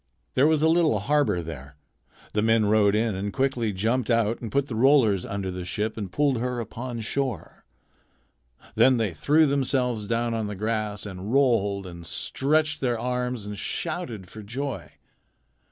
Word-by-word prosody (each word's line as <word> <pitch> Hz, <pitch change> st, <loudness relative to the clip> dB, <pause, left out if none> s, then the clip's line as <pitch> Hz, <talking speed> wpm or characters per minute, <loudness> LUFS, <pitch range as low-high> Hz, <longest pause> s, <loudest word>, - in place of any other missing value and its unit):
There 135 Hz, +3 st, +4 dB
was 155 Hz, -1 st, +2 dB
a -, -, +5 dB
little 160 Hz, -7 st, +3 dB
harbor 105 Hz, -5 st, +1 dB
there. 70 Hz, -3 st, -9 dB, 0.6 s
The 105 Hz, -, +1 dB
men 115 Hz, 0 st, +3 dB
rowed 105 Hz, -1 st, +4 dB
in 110 Hz, 0 st, +1 dB
and 100 Hz, +2 st, -3 dB
quickly 130 Hz, -4 st, 0 dB
jumped 110 Hz, +6 st, 0 dB
out 115 Hz, -1 st, +1 dB
and 115 Hz, -, -5 dB
put 140 Hz, 0 st, +1 dB
the 130 Hz, -, -7 dB
rollers 115 Hz, -5 st, +4 dB
under 100 Hz, -2 st, -3 dB
the 90 Hz, 0 st, -5 dB
ship 105 Hz, +5 st, -3 dB
and 100 Hz, -5 st, -5 dB
pulled 140 Hz, -2 st, +1 dB
her 125 Hz, 0 st, -2 dB
upon 120 Hz, +1 st, -5 dB
shore. 125 Hz, -, -4 dB, 1.1 s
Then 130 Hz, -1 st, +5 dB
they 110 Hz, -6 st, -1 dB
threw 150 Hz, -, +3 dB
themselves 125 Hz, -6 st, 0 dB
down 115 Hz, +1 st, 0 dB
on 110 Hz, -2 st, -2 dB
the 105 Hz, -, -5 dB
grass 105 Hz, 0 st, -2 dB
and 95 Hz, +1 st, -6 dB
rolled 115 Hz, -8 st, +2 dB
and 85 Hz, -2 st, -9 dB
stretched 155 Hz, -, +1 dB
their 120 Hz, -3 st, 0 dB
arms 125 Hz, -2 st, -2 dB
and 105 Hz, 0 st, -5 dB
shouted 130 Hz, -, -4 dB
for 110 Hz, -, -10 dB
joy. 130 Hz, +6 st, -5 dB
115 Hz, 170 wpm, -25 LUFS, 105-135 Hz, 1.1 s, a